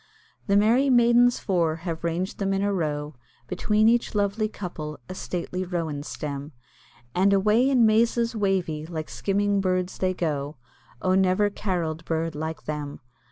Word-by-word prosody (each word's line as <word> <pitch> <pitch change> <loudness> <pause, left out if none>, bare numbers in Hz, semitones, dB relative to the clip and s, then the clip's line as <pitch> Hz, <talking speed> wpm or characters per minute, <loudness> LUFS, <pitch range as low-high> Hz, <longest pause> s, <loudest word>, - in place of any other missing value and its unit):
The 200 0 +4
merry 235 +7 +4
maidens 240 0 +5
four 170 -5 0
have 165 -2 -4
ranged 170 +3 -2
them 195 -1 0
in 195 - 0
a 200 0 +1
row, 150 -4 -2 0.3
Between 215 0 +2
each 235 -1 +2
lovely 205 +1 0
couple 155 -7 -6
a - - -6
stately 180 0 -4
rowan 165 -5 -3
stem, 145 0 -6 0.6
And 195 +2 +3
away 215 +6 +3
in 250 -4 +4
mazes 230 +1 +2
wavy, 185 -7 -1
like 160 -2 -5
skimming 200 0 0
birds 185 -1 -1
they 185 0 0
go, 150 -3 -2 0.5
Oh, 185 - +2
never 190 +2 +3
caroll'd 170 -6 -3
bird 165 0 -1
like 160 +2 -5
them! 150 -1 -5
185 Hz, 155 wpm, -25 LUFS, 160-210 Hz, 0.6 s, maidens